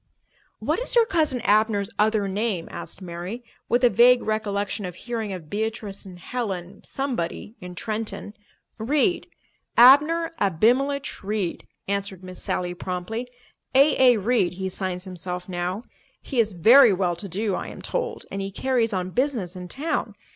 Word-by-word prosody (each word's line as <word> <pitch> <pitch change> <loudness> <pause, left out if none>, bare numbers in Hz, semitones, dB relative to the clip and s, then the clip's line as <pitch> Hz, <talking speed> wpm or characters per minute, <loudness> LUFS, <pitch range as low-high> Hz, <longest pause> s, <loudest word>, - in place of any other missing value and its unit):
"What - - -1
is - - -3
your 470 -1 +6
Cousin 310 - +1
Abner's 210 -2 +2
other 210 -1 +2
name?" 195 -3 -2
asked 190 - -7
Mary, 180 +7 -6 0.3
with 240 +2 +2
a 245 - +7
vague 245 +1 +6
recollection 205 -1 -2
of 180 -2 -5
hearing 225 -2 -4
of 180 -5 -7
Beatrice 210 0 -4
and 180 -1 -10
Helen—somebody—in 195 -1 -5
Trenton. 215 +1 -4 0.5
"Reed—Abner 300 - +3
Abimelech 250 - +1
Reed," 200 -3 -3 0.2
answered 200 -2 -3
Miss 185 -1 -8
Sally 180 -1 -1
promptly. 185 +7 -4 0.5
"A.A. 265 -3 +6
Reed, 200 -4 +1
he 190 +1 -4
signs 185 -1 -4
himself 180 -1 -6
now. 180 +3 -3 0.4
He 265 - -3
is 215 -3 +2
very 230 +8 +7
well 180 -2 0
to 195 +3 -8
do, 200 +3 -1
I - - -3
am - - -9
told, - - -3
and 195 - -3
he 195 - -3
carries 235 +1 0
on 185 -1 -2
business 240 -7 -1
in 180 -1 -7
town. 300 - -2
210 Hz, 145 wpm, -24 LUFS, 185-245 Hz, 0.5 s, a